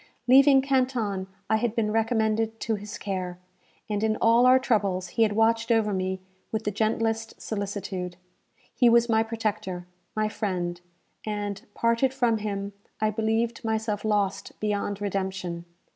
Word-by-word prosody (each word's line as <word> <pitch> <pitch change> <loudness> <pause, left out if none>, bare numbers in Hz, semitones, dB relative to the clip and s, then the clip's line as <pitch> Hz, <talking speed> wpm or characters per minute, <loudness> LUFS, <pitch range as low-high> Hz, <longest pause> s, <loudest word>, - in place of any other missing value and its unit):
Leaving 270 +1 +7
Canton, 250 -8 0 0.2
I 220 - +3
had 230 0 -1
been 215 -2 +1
recommended 225 0 +1
to 225 - 0
his 205 0 -5
care, 185 -3 -4 0.5
and 210 0 -1
in 220 0 +2
all 235 +2 +5
our 255 +1 +7
troubles 200 -8 0
he 230 - -2
had 215 -2 +4
watched 225 +1 +2
over 220 -2 +3
me 190 0 -1 0.3
with 220 0 -2
the 210 - -1
gentlest 225 +2 -1
solicitude. 195 -4 -4 0.6
He 245 -2 +5
was 235 0 +5
my 220 -1 +4
protector 215 -5 -3 0.3
my 215 0 +1
friend; 180 -5 -3 0.4
and, 205 -2 -3
parted 230 +3 +2
from 235 -4 +2
him, 200 -1 -3 0.3
I 215 0 +2
believed 225 +2 0
myself 220 -2 -1
lost 205 -3 -1
beyond 205 -1 -2
redemption. 190 -3 -3
215 Hz, 145 wpm, -26 LUFS, 200-225 Hz, 0.6 s, Leaving